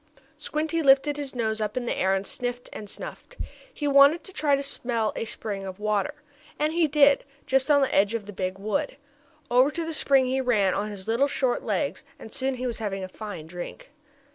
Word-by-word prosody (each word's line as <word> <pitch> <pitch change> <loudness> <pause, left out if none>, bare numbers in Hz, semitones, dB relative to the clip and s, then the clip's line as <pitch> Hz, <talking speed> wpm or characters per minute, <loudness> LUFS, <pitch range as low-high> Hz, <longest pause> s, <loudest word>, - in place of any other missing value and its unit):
Squinty 315 +2 -2
lifted 280 +1 +4
his 280 -3 -5
nose 220 -2 -1
up 210 +2 -2
in 250 - -1
the - - -1
air, 190 +1 +2
and 195 +1 -2
sniffed 245 +2 -3
and 210 - -8
snuffed. - - -8 0.3
He 295 - -3
wanted 280 +4 +6
to 380 - -11
try 295 -4 +2
to 275 - -2
smell 235 -5 -1
a - - -3
spring 210 -3 -5
of 190 0 -7
water, 215 +7 0 0.4
and 305 +1 0
he 335 -1 +3
did, 285 -1 +5 0.2
just 265 +2 +1
on 285 -1 +5
the 270 - +1
edge 205 +3 +3
of 220 -3 -4
the 205 - -9
big 185 0 -3
wood. 215 +9 -2 0.5
Over 255 +3 +5
to 330 +2 -3
the 325 - -4
spring 275 -3 +4
he 260 +1 0
ran 210 -7 +2
on 210 +1 -2
his 200 -2 -7
little 235 +5 +2
short 260 -3 0
legs, 190 -6 -2
and 220 - -12
soon 265 0 -1
he 255 0 -4
was 235 -2 -3
having 195 -3 -3
a - - -4
fine 200 -4 -8
drink. 175 - -8
245 Hz, 220 wpm, -26 LUFS, 210-280 Hz, 0.5 s, wanted